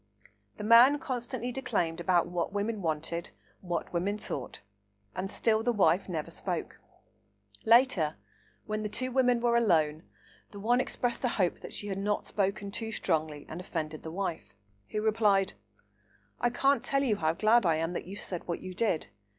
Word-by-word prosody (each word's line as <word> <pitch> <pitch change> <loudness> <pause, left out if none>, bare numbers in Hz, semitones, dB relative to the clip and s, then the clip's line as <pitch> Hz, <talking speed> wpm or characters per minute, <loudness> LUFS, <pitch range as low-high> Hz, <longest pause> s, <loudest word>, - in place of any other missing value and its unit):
The - - -6
man 235 +6 +7
constantly 250 -2 -3
declaimed 175 -11 -1
about 175 0 +3
"what 175 +1 -2
women 205 +1 -2
wanted, 165 +1 -2 0.3
what 175 -2 -4
women 190 +4 0
thought," 140 -10 -6 0.5
and 190 +1 -3
still 220 +1 +2
the 240 +2 +1
wife 190 -4 +2
never 160 -4 -3
spoke. - - -4 0.9
Later, 225 - +4 0.5
when 215 0 -2
the 210 - -3
two 255 +4 -2
women 250 -2 +3
were 235 0 +2
alone, 160 -9 +3 0.5
the 205 - -10
one 240 +5 +3
expressed 245 0 -2
a - - +3
hope 185 -7 0
that - - -9
she - - -4
had 195 -1 -3
not 205 +1 -1
spoken 200 0 -1
too 225 +2 -4
strongly 155 -7 -1
and 165 +3 -6
offended 155 -3 -4
the 160 - -7
wife, 160 - -4 0.3
who 215 0 -2
replied, 210 -3 +3 0.9
"I 240 - +2
can't 275 +3 +2
tell 275 0 +1
you 220 -6 +1
how 160 -3 +1
glad 215 +6 +4
I 165 - +3
am 165 +2 -1
that 175 - -5
you 195 - -7
said 180 -3 -5
what 170 - -2
you 185 - -7
did. 195 -5 0
200 Hz, 175 wpm, -30 LUFS, 170-230 Hz, 0.9 s, man